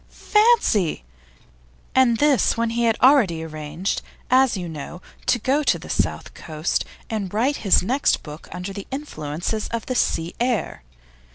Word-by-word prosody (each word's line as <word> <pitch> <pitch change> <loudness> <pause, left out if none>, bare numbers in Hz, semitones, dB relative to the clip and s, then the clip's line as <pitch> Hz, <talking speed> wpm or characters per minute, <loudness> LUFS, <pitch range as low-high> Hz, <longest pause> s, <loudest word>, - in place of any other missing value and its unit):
Fancy! 420 - +2 0.9
And 255 -3 +4
this 290 -4 +3
when 230 0 0
he 235 +1 0
had 225 -1 +2
already 225 - +5
arranged, 155 +3 -4 0.3
as 255 -3 +4
you 180 -2 -4
know, 160 +2 -7 0.3
to 245 - +4
go 265 +6 +1
to 295 - +2
the - - -8
South - - -2
Coast 155 0 -2 0.2
and 205 -5 -3
write 250 +7 +1
his 195 -4 +3
next 260 +8 +1
book 150 +1 -10
under 180 +2 -6
the 200 0 -8
influences 210 - -4
of 230 -1 -4
the 255 - -2
sea 170 -8 0
air. 240 - -1
220 Hz, 155 wpm, -22 LUFS, 170-260 Hz, 0.9 s, already